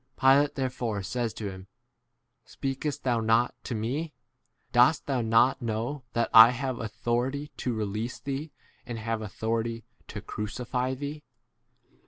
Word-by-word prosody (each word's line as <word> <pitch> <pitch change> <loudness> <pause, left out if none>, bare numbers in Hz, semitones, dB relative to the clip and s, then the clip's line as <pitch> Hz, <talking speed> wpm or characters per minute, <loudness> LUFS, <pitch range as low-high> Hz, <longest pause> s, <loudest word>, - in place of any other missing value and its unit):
Pilate 135 +2 +5
therefore 125 -6 -2
says 120 +4 -2
to 105 -3 -4
him, 95 0 -11 0.8
Speakest 135 +5 -4
thou 120 -3 +2
not 115 +2 +3
to 120 - -3
me? 140 +9 -3 0.6
Dost 125 +5 +4
thou 135 -3 0
not 115 +4 +3
know 120 +5 -2
that 115 - 0
I 115 +1 +11
have 125 0 -3
authority 120 +5 -2
to 125 - -2
release 110 +3 -3
t 140 +4 -5
thee 150 +3 -6 0.4
and 120 -2 -4
have 115 0 -2
authority 115 +2 -2 0.2
to - - -6
crucify 125 +4 -3
thee 145 +3 -5
120 Hz, 140 wpm, -28 LUFS, 115-135 Hz, 0.8 s, I